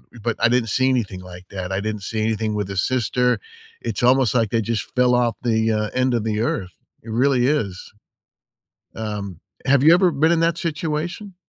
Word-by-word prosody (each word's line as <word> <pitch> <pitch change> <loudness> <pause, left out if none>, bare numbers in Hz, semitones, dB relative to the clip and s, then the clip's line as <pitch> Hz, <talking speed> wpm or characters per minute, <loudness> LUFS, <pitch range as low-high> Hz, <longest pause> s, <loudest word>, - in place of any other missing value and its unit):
eh, - - -11
but 115 - 0
I - - +4
didn't 120 -3 +1
see 130 +5 +2
anything 110 -8 -1
like 90 0 -12
that, 95 -1 -5
I 95 - -1
didn't 105 -2 -4
see 110 +2 -3
anything 110 0 -1
with 105 -2 -2
his 95 -1 0
sister. 125 0 +1 0.4
It's - - -3
almost 130 -1 +4
like 115 -4 +1
they 115 -1 +1
just 110 -1 -2
fell 125 0 +4
off 120 -1 +1
the, 110 -1 +1
uh, 105 0 0
end 130 0 +1
of 115 -3 0
the 110 -1 -1
Earth. 95 -5 -2 0.3
It 115 - -8
really 125 +1 +2
is. 105 -11 -2 1.0
Um, 105 -5 -5 0.3
have 135 0 +4
you 160 - +8
ever 180 -1 +4
been 160 +3 +2
in 165 - +2
that 165 0 +2
situation? 170 +5 -3
115 Hz, 205 wpm, -21 LUFS, 105-130 Hz, 1.0 s, you